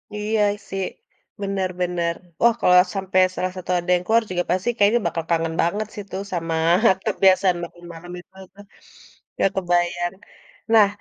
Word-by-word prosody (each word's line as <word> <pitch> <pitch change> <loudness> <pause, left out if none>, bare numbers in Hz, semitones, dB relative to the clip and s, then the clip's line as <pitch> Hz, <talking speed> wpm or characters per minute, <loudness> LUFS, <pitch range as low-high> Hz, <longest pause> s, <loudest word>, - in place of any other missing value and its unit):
Iya 210 +1 -1 0.3
sih, 195 0 -3 0.6
bener 195 -2 -1
bener. 175 -1 0 0.3
Wah 235 0 +5
kalau 180 - +5 0.2
sampe 190 -1 -2 0.2
salah 185 0 -2
satu 185 0 -5
ada 175 +1 -4
yang 175 - -2
keluar 230 +1 +3
juga 175 0 0
pasti 185 +6 0
kayaknya 210 +4 +4
bakal 165 0 -3
kangen 165 -1 0
banget 205 +6 -1
sih 205 - -7
tuh 195 - -4
sama 165 -1 -2 0.5
kebiasaan 185 -2 +3
bangun 175 0 -10
malem 175 +2 -11
itu 185 - -18 0.2
tuh, 205 +1 -14 0.8
ya - - +4
kebayang. 175 -1 0 0.6
Nah, 215 -3 +7
185 Hz, 160 wpm, -22 LUFS, 175-200 Hz, 0.8 s, Nah